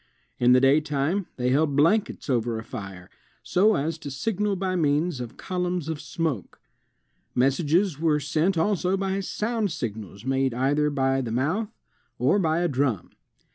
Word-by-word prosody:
In 125 Hz, 0 st, +5 dB
the 125 Hz, -, +6 dB
daytime 150 Hz, +6 st, +2 dB
they 125 Hz, -1 st, 0 dB
held 145 Hz, +2 st, +2 dB
blankets 195 Hz, +9 st, +2 dB
over 120 Hz, -4 st, 0 dB
a 110 Hz, -, -5 dB
fire, 95 Hz, -5 st, -8 dB, 0.4 s
so 210 Hz, +4 st, +3 dB
as 155 Hz, +3 st, -2 dB
to 145 Hz, -, -7 dB
signal 205 Hz, +7 st, -1 dB
by 190 Hz, -1 st, -2 dB
means 155 Hz, -1 st, +1 dB
of 120 Hz, 0 st, -8 dB
colimms 180 Hz, -3 st, -2 dB
of 160 Hz, -2 st, -4 dB
smoke. 155 Hz, -, -3 dB, 0.8 s
Messages 150 Hz, +6 st, +2 dB
were 155 Hz, -2 st, +2 dB
sent 155 Hz, +6 st, 0 dB
also 185 Hz, +2 st, +1 dB
by 195 Hz, 0 st, -1 dB
sound 215 Hz, +1 st, -2 dB
signals 110 Hz, -, -6 dB
made 135 Hz, -2 st, 0 dB
either 145 Hz, +4 st, +2 dB
by 135 Hz, -2 st, +1 dB
the 120 Hz, -, -4 dB
mouth 160 Hz, -, 0 dB, 0.5 s
or 135 Hz, -, +3 dB
by 165 Hz, -2 st, +1 dB
a 175 Hz, -, +2 dB
drum. 130 Hz, -, -1 dB
150 Hz, 155 wpm, -25 LUFS, 130-180 Hz, 0.8 s, the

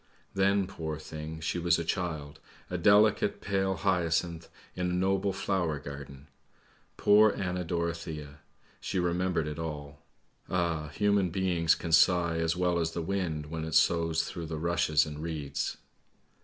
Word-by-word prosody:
Then, 100 Hz, 0 st, +2 dB
poor 80 Hz, -4 st, -5 dB
thing, 80 Hz, +1 st, -7 dB
she 85 Hz, +2 st, -1 dB
was 85 Hz, -1 st, +3 dB
a 85 Hz, -, -3 dB
child, 80 Hz, -5 st, -3 dB, 0.3 s
a 90 Hz, -, -1 dB
delicate, 105 Hz, +2 st, +4 dB
pale 95 Hz, -1 st, 0 dB
hyacinth 85 Hz, -2 st, 0 dB, 0.3 s
in 90 Hz, 0 st, -1 dB
a -, -, -1 dB
noble 95 Hz, +2 st, +1 dB
flower 95 Hz, -5 st, -1 dB
garden. 70 Hz, -1 st, -9 dB, 0.7 s
Poor 105 Hz, +1 st, +6 dB
Anna 90 Hz, -1 st, -2 dB
Dorothea; 85 Hz, -4 st, -4 dB, 0.4 s
she -, -, -3 dB
remembered 90 Hz, -1 st, 0 dB
it 75 Hz, +1 st, -5 dB
all! 75 Hz, -3 st, -6 dB, 0.5 s
Ah, 85 Hz, -4 st, 0 dB
human 100 Hz, +4 st, +1 dB
beings 85 Hz, -2 st, +2 dB
can 85 Hz, -, -5 dB
sigh 85 Hz, 0 st, +4 dB
as 80 Hz, +1 st, 0 dB
well 90 Hz, -1 st, +1 dB
as 80 Hz, -1 st, -1 dB
the 85 Hz, -, -3 dB
wind 80 Hz, -5 st, -2 dB
when 80 Hz, -1 st, -3 dB
it 80 Hz, -1 st, -3 dB
soughs 80 Hz, -1 st, +3 dB
through 85 Hz, -2 st, -6 dB
the 80 Hz, 0 st, -4 dB
rushes 80 Hz, -2 st, +2 dB
and 75 Hz, -1 st, -7 dB
reeds. 80 Hz, -4 st, -3 dB
85 Hz, 150 wpm, -29 LUFS, 80-90 Hz, 0.7 s, Poor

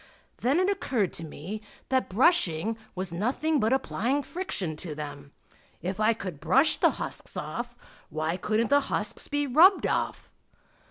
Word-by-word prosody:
Then 270 Hz, +7 st, +2 dB
it 370 Hz, -, +3 dB
occurred 255 Hz, -, 0 dB
to 165 Hz, -, -5 dB
me 165 Hz, +7 st, -6 dB, 0.3 s
that 260 Hz, -1 st, +1 dB
brushing 220 Hz, -, +3 dB, 0.2 s
was 185 Hz, -2 st, -3 dB
nothing 275 Hz, -, +1 dB
but 220 Hz, +2 st, +2 dB
applying 265 Hz, +1 st, 0 dB
friction 205 Hz, -, -3 dB
to 155 Hz, -2 st, -5 dB
them. 145 Hz, -1 st, -7 dB, 0.5 s
If 185 Hz, +3 st, -4 dB
I 215 Hz, +2 st, +4 dB
could 185 Hz, -9 st, -6 dB
brush 255 Hz, -, +3 dB
the -, -, +6 dB
husks -, -, -6 dB
off, -, -, -4 dB, 0.3 s
why 155 Hz, +2 st, -1 dB
couldn't 215 Hz, +6 st, 0 dB
the 285 Hz, -, +7 dB
husks 210 Hz, +2 st, -2 dB
be 290 Hz, 0 st, 0 dB
rubbed 335 Hz, +9 st, +6 dB
off? -, -, -1 dB
215 Hz, 155 wpm, -28 LUFS, 170-280 Hz, 0.5 s, the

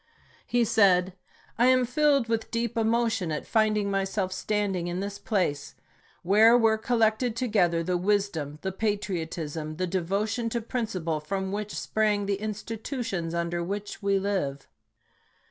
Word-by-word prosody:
He 240 Hz, -1 st, +2 dB
said: 190 Hz, -5 st, +4 dB, 0.5 s
I 245 Hz, -, +5 dB
am 255 Hz, -1 st, +4 dB
filled 280 Hz, -1 st, +2 dB
with 225 Hz, -1 st, -1 dB
deep 235 Hz, -1 st, -2 dB
emotion 225 Hz, -5 st, +1 dB
at 150 Hz, -, -3 dB
finding 215 Hz, -2 st, +1 dB
myself 195 Hz, -1 st, -1 dB
stand 205 Hz, -1 st, -1 dB
ing 175 Hz, -1 st, -2 dB
in 175 Hz, +1 st, -3 dB
this 200 Hz, +1 st, -4 dB
place, 145 Hz, -9 st, -1 dB, 0.5 s
where 215 Hz, +6 st, +6 dB
were 220 Hz, -2 st, +3 dB
collected 225 Hz, 0 st, +1 dB
together 195 Hz, -9 st, +1 dB
the 180 Hz, +1 st, 0 dB
wisdom, 180 Hz, -6 st, -1 dB
the 190 Hz, -, -1 dB
patriotism, 165 Hz, -7 st, -3 dB
the 185 Hz, +3 st, -1 dB
devotion 200 Hz, +6 st, -1 dB
to 235 Hz, +1 st, -2 dB
principle 195 Hz, -9 st, -2 dB
from 190 Hz, +5 st, -3 dB
which 210 Hz, +1 st, -4 dB
sprang 210 Hz, -2 st, 0 dB
the 200 Hz, 0 st, 0 dB
institutions 215 Hz, -, -4 dB
under 170 Hz, 0 st, -1 dB
which 205 Hz, +4 st, -5 dB
we 200 Hz, -1 st, +2 dB
live. 185 Hz, -9 st, -2 dB
200 Hz, 145 wpm, -27 LUFS, 180-225 Hz, 0.5 s, where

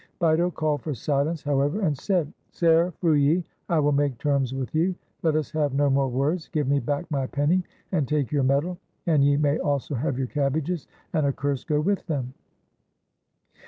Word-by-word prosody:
Bito 170 Hz, 0 st, +3 dB
called 155 Hz, -4 st, -1 dB
for 150 Hz, -3 st, -3 dB
silence, 145 Hz, +6 st, -1 dB
however, 145 Hz, +6 st, +1 dB
and 155 Hz, -7 st, +1 dB
said: 170 Hz, +1 st, -1 dB
— -, -, -44 dB
"Ser 170 Hz, +1 st, +3 dB
Frulli, 155 Hz, +1 st, +3 dB, 0.3 s
I 170 Hz, -, +2 dB
will 145 Hz, -1 st, +3 dB
make 140 Hz, -3 st, +1 dB
terms 140 Hz, -1 st, 0 dB
with 135 Hz, -1 st, -4 dB
you; 175 Hz, +4 st, +1 dB, 0.3 s
let 160 Hz, -2 st, +2 dB
us 155 Hz, -2 st, -1 dB
have 150 Hz, -4 st, 0 dB
no 145 Hz, 0 st, +3 dB
more 135 Hz, 0 st, +2 dB
words. 140 Hz, +7 st, -1 dB
Give 150 Hz, -5 st, -1 dB
me 140 Hz, +1 st, +3 dB
back 145 Hz, +3 st, -2 dB
my 135 Hz, -3 st, 0 dB
penny 150 Hz, +7 st, +1 dB, 0.3 s
and 155 Hz, -8 st, +1 dB
take 145 Hz, -3 st, 0 dB
your 145 Hz, -2 st, +2 dB
medal, 140 Hz, +7 st, +1 dB, 0.3 s
and 155 Hz, -5 st, +3 dB
ye 140 Hz, 0 st, +4 dB
may 145 Hz, 0 st, +2 dB
also 145 Hz, 0 st, -1 dB
have 130 Hz, 0 st, -1 dB
your 135 Hz, -, 0 dB
cabbages, 150 Hz, +4 st, -1 dB, 0.3 s
and 155 Hz, -4 st, +2 dB
a -, -, +2 dB
curse 140 Hz, -1 st, -2 dB
go 150 Hz, -1 st, 0 dB
with 195 Hz, +6 st, 0 dB
them!" 130 Hz, -6 st, -2 dB
145 Hz, 195 wpm, -25 LUFS, 140-160 Hz, 0.3 s, ye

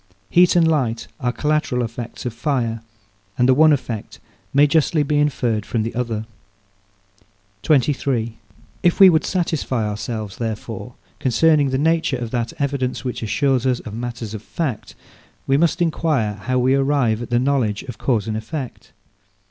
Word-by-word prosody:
Heat 180 Hz, 0 st, +5 dB
and 170 Hz, -2 st, +5 dB
light 125 Hz, -8 st, 0 dB
are 125 Hz, -3 st, 0 dB
collateral 150 Hz, -2 st, 0 dB
effects 115 Hz, +1 st, -6 dB
of 120 Hz, -, -3 dB
fire, 120 Hz, -3 st, -1 dB, 0.6 s
and 125 Hz, -, +3 dB
the 130 Hz, -, +6 dB
one 155 Hz, +3 st, +6 dB
effect 120 Hz, -6 st, -3 dB, 0.3 s
may 140 Hz, +2 st, +5 dB
justly 150 Hz, +1 st, +2 dB
be 145 Hz, +1 st, +1 dB
inferred 125 Hz, -7 st, 0 dB
from 110 Hz, +1 st, -2 dB
the 115 Hz, -, -4 dB
other. 115 Hz, -3 st, -2 dB, 1.4 s
23. 130 Hz, -4 st, +1 dB, 0.5 s
If 175 Hz, -, +2 dB
we 190 Hz, -2 st, +9 dB
would 160 Hz, -, +2 dB
satisfy 155 Hz, -, -1 dB
ourselves, 105 Hz, -1 st, -5 dB
therefore, 110 Hz, -2 st, -5 dB, 0.2 s
concerning 145 Hz, +3 st, +3 dB
the 130 Hz, -, 0 dB
nature 160 Hz, -2 st, +1 dB
of 120 Hz, -2 st, -5 dB
that 120 Hz, -2 st, -2 dB
evidence, 130 Hz, -3 st, -2 dB
which 125 Hz, -, -3 dB
assures 130 Hz, +3 st, +1 dB
us 125 Hz, -2 st, +1 dB
of 105 Hz, -, -9 dB
matters 115 Hz, -1 st, -5 dB
of 110 Hz, -, -6 dB
fact, 130 Hz, 0 st, -4 dB, 0.5 s
we 135 Hz, -, +2 dB
must 170 Hz, +3 st, +2 dB
enquire 155 Hz, -10 st, 0 dB
how 115 Hz, +6 st, -2 dB
we 130 Hz, +1 st, +3 dB
arrive 135 Hz, -5 st, +1 dB
at 120 Hz, -, -6 dB
the 120 Hz, -, +2 dB
knowledge 125 Hz, -5 st, 0 dB
of 120 Hz, -5 st, -9 dB
cause 115 Hz, -6 st, 0 dB
and 110 Hz, -, -2 dB
effect. 125 Hz, +4 st, -6 dB
125 Hz, 160 wpm, -21 LUFS, 115-145 Hz, 1.4 s, we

